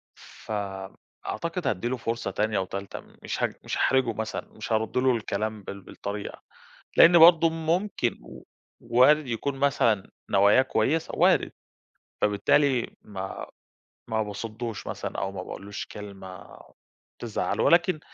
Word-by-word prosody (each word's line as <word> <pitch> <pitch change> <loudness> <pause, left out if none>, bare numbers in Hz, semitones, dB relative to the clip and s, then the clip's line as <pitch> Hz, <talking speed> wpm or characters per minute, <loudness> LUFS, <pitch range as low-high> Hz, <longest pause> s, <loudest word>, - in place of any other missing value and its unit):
فم 95 -3 -6 0.3
أعتقد 170 -3 -3
هادّي 105 -1 -1
له 130 +1 -1
فرصة 115 0 -3
تانية 110 -1 0
وتالتة 95 +1 -5
م - - -18
مش - - -4
هج - - +1
مش - - -3
هاحرجه 130 -3 +2
مثلًا 110 0 -4
مش 110 +1 -8
هارد 110 +2 0
له 130 -1 +3
الكلام 110 -1 -3
بال 100 0 -8
بالطريقة، 100 +2 -7 0.6
لإن 170 0 +8
برضه 165 0 +7
ممكن 165 - -1
و - - -12 0.4
وارد 130 +6 +4
يكون 135 +3 -3
مثلًا 115 -7 +2 0.2
نواياه 100 +5 +5
كويسة 135 +5 0
وارد، - - +3 0.7
فبالتالي 120 +5 +2
ما 95 -2 -6 0.6
ما 110 -1 +1
باصدّوش 110 +2 -6
مثلًا - - -5
أو 95 +3 -2
ما 90 -2 -6
باقولوش 100 +2 -7
له - - -6
كلمة 95 -3 -10 0.6
تزعّله، - - -2
ولكن 170 -1 +4
110 Hz, 135 wpm, -26 LUFS, 100-135 Hz, 0.7 s, لإن